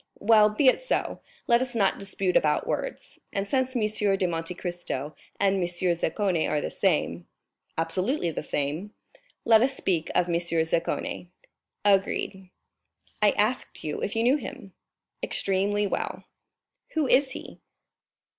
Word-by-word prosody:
"Well, 215 0 +5
be 215 +7 0
it 260 - +5
so—let 475 - -1
us 255 -1 -3
not 200 -4 +2
dispute 195 -2 -1
about 150 -1 +3
words; - - -4
and 200 0 -2
since 260 +2 0
M. 225 -3 +2 0.3
de 190 - +1
Monte 165 0 -2
Cristo 175 -6 -4 0.2
and 195 0 +3
M. - - -1
Zaccone 175 0 0
are 150 - +1
the - - -4
same——" 150 - 0 0.5
"Absolutely 175 - 0
the - - -4
same." 150 +9 -3 0.5
"Let 225 -1 +6
us 265 +2 +2
speak 170 -4 -1
of 180 - +3
M. 170 - -1
Zaccone." 165 +1 -1 0.6
"Agreed." 195 -1 +1 0.7
"I 210 - +6
asked 220 +5 0
you 150 - -3
if 205 - -2
you 225 - +1
knew 255 +5 +4
him?" 195 -7 -9 0.5
"Extremely 200 +2 +1
well." 200 - -3 0.7
"Who 310 -3 +2
is 260 +1 +3
he?" - - -9
195 Hz, 140 wpm, -26 LUFS, 170-230 Hz, 0.7 s, Let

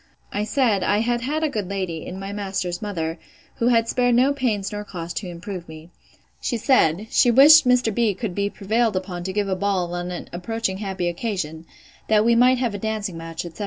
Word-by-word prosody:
I 205 +1 -1
said, 225 -5 +1
I 205 - +2
had 240 +1 0
had 300 +6 -2
a - - +3
good 210 -8 -4
lady, 185 -5 -4
in 185 - -6
my 195 +1 -6
master's 190 -3 -3
mother, 165 -5 -3 0.4
who 235 - +1
had 230 -2 +3
spared 245 0 +2
no 260 +4 +4
pains 225 -8 -1
nor 210 0 -4
cost 175 -4 -7
to 200 - -4
improve 175 0 -7
me. 160 +2 -11 0.5
She 240 - -1
said, 210 - +2
she 245 - +4
wished 280 +4 +8
Mr. 250 -3 +3
B—— 225 -3 +1
could 200 -1 -4
be 200 +2 -1
prevailed 220 +2 0
upon 185 -2 -4
to 190 - -2
give 205 +1 -1
a 190 - 0
ball 185 -3 -1
on 175 0 -3
an 180 - -6
approaching 190 +2 -3
happy 190 -4 -3
occasion, 170 -4 -4 0.4
that 215 0 +3
we 235 - +4
might 250 +2 +5
have 240 -4 -1
a 205 - -4
dancing 215 -3 -3
match, 165 +1 -6
etc. 170 +3 -10
205 Hz, 215 wpm, -23 LUFS, 180-230 Hz, 0.5 s, wished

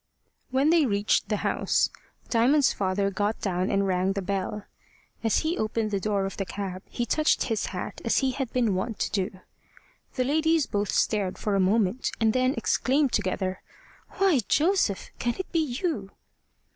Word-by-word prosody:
When 270 +4 +3
they 330 -4 +4
reached 205 -1 +1
the 210 - +1
house, - - +1 0.4
Diamond's 255 +5 +4
father 195 +1 0
got 205 +2 -1
down 185 -1 -1
and 200 0 +1
rang 185 0 +1
the 200 - -2
bell. 200 +2 -3 0.6
As 225 - +2
he 320 +3 -1
opened 215 0 -1
the 200 - 0
door 200 -1 0
of 195 - -5
the 195 - -1
cab, 190 -1 -5
he 240 - -2
touched 305 +6 +2
his 225 -4 -1
hat 180 -2 -6
as 230 - +1
he 265 -1 +2
had 260 -2 -4
been 235 -5 +1
wont 200 +4 -2
to - - -2
do. 190 -1 -2 0.7
The 255 - +1
ladies 315 +3 +2
both 205 -1 -2
stared 200 -4 0
for 210 - -2
a 195 - +2
moment, 205 +4 +2
and 220 -1 +3
then 255 +1 +2
exclaimed 265 +4 +1
together: 185 -2 -1 0.5
"Why, 380 -8 +3
Joseph! 315 - +1
can 240 0 -1
it 375 - -6
be 335 - +2
you?" 280 - -2
215 Hz, 175 wpm, -26 LUFS, 195-265 Hz, 0.7 s, they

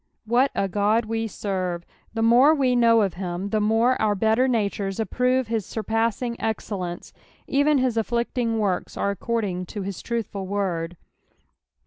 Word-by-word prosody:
What 245 +5 +3
a 195 - +1
God 210 +4 +1
we 225 0 -2
serve 185 -4 -3
I - - -33 0.3
The 225 - -1
more 250 +7 +6
we 260 -4 +2
know 230 -2 +5
of 195 -4 -1
him, 180 +1 -4
the 215 +1 +1
more 225 +4 +2
our 210 -1 +2
betl«r 220 +5 +2
natures 200 -4 -1
approve 250 +3 +1
his 225 -1 -1
surpassing 225 +3 -1
excellence; 195 -5 -4 0.3
even 285 +2 +3
his 255 -3 +1
afOicting 235 0 0
works 200 -4 -1
are 200 - 0
accord 230 +3 -2
ing 180 -2 -4
to 205 +2 -5
his 195 -1 -5
truthful 210 -5 -4
word. 180 -4 -2
220 Hz, 160 wpm, -24 LUFS, 195-235 Hz, 0.3 s, more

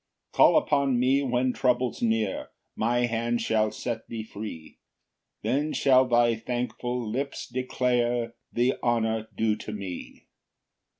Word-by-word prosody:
3 - - -17
"Call - - +7
upon 140 -4 +2
me 130 +3 +3
when 125 -1 +1
trouble's 125 -2 0
near, 110 -4 0 0.3
"My 120 +2 +1
hand 115 0 -1
shall 110 -1 +1
set 115 -1 -5
thee 115 -1 -5
free; 105 -7 -8 0.6
"Then 145 +4 0
shall 130 -1 +4
thy 120 -1 +4
thankful 120 +1 -3
lips 135 +6 -3
declare 120 -2 0 0.2
"The 125 +2 +1
honour 110 -2 0
due 110 -1 +2
to 110 - -7
me. 95 -4 -7
120 Hz, 130 wpm, -27 LUFS, 110-125 Hz, 0.6 s, Call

